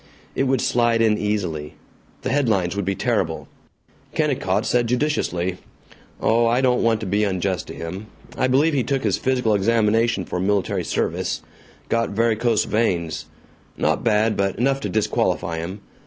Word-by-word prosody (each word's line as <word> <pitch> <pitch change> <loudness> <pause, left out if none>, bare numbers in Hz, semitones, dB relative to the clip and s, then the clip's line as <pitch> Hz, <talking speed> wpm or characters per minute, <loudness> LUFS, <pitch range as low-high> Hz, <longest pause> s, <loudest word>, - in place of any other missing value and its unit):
It 135 - 0
would 130 -1 +1
slide 120 -1 +2
in 110 -2 +4
easily. 90 -8 -2 0.5
The 130 - -1
headlines 110 -10 +1
would 100 -2 -2
be 95 +1 0
terrible. - - -1 0.7
Kennicott 125 -10 0
said 120 -1 +2
judiciously, 115 - 0 0.6
"Oh, 115 +1 +3
I 120 +2 +2
don't 125 -2 +2
want 115 -1 +2
to - - -3
be 100 +2 +1
unjust 95 -2 -1
to - - -8
him. 90 +6 -6 0.3
I 130 - +1
believe 145 +5 +3
he 140 - +2
took 135 +3 -1
his - - +1
physical 125 -4 +1
examination 110 0 +2
for 90 - -3
military 100 +1 0
service. - - -2 0.4
Got 115 0 0
varicose 115 +1 +1
veins 85 -8 -1 0.5
not - - 0
bad, 110 -1 +2
but 100 -1 0
enough 135 +4 +1
to - - -4
disqualify 85 -5 0
him. 95 +5 -6
110 Hz, 155 wpm, -22 LUFS, 95-120 Hz, 0.7 s, in